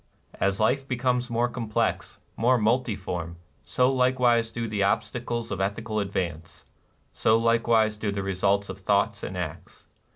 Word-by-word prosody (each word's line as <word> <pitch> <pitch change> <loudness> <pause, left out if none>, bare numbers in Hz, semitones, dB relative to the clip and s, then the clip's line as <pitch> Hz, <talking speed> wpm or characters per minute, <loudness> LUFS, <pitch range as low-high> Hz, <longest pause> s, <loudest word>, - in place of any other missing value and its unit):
As 100 +1 +1
life 135 +5 +1
becomes 125 -1 0
more 120 +1 +1
complex, 115 -2 -2 0.2
more 125 +3 +3
multiform, 100 -8 -1 0.3
so 125 +1 +2
likewise 125 -3 +3
do 115 0 -3
the 105 -2 -2
obstacles 120 +3 -1
to 100 - -3
ethi 100 +4 -2
cal 110 -1 -1
advance, 90 -5 -4 0.2
— - - -40
so 110 0 +3
likewise 115 -2 +2
do 105 -1 -2
the 100 0 -3
results 100 +1 +1
of - - -7
thoughts - - +1
and - - -5
acts. - - -7
115 Hz, 155 wpm, -26 LUFS, 100-120 Hz, 0.3 s, more